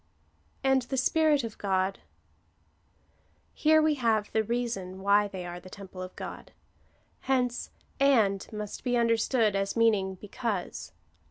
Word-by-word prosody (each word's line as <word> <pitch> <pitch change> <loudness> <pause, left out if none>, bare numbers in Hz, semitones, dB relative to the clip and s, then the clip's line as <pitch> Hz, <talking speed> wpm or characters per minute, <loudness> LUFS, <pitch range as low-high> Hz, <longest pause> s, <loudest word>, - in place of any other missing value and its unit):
And 265 -1 +4
the 265 +2 -4
Spirit 300 +1 +3
of 225 -2 -7
God. 190 -1 0 1.5
Here 315 0 +4
we 310 0 +3
have 220 -3 +1
the 220 - +2
reason 215 -5 -3
why 205 +1 +4
they 190 -3 -7
are 175 0 -6
the 185 +1 -13
temple 190 -1 -10
of 185 0 -8
God. - - -8 0.7
Hence 250 -2 0 0.3
and 225 -9 +3
must 210 -1 -6
be 245 -2 +1
understood 230 -2 +2
as 195 +3 -1
meaning 205 -4 +3
because. 210 0 -4
220 Hz, 135 wpm, -28 LUFS, 195-245 Hz, 1.5 s, And